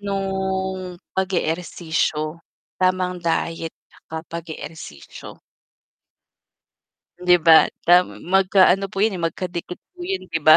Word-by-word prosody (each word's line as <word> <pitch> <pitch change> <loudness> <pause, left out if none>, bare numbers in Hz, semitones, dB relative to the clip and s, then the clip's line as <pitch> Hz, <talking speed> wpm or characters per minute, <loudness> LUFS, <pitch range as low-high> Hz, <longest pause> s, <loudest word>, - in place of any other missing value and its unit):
nung 190 -2 -2 0.2
pag-eehersisyo, 165 -3 -1 0.4
tamang 185 -1 +1
diet 165 -1 -2 0.3
at 160 0 -6
pag-eehersisyo. 160 - -9 1.9
'Di 180 0 +6
ba? 165 -1 +10 0.3
Tam 180 +1 +7 0.3
magka-ano 195 0 +5
po - - -13
yun 210 -2 +2
eh, 175 - -6
magkadikit 175 +1 -5
po 365 - -32
yun 385 +1 -2
'di 165 -1 -2
ba? 155 0 +10
180 Hz, 100 wpm, -22 LUFS, 165-190 Hz, 1.9 s, ba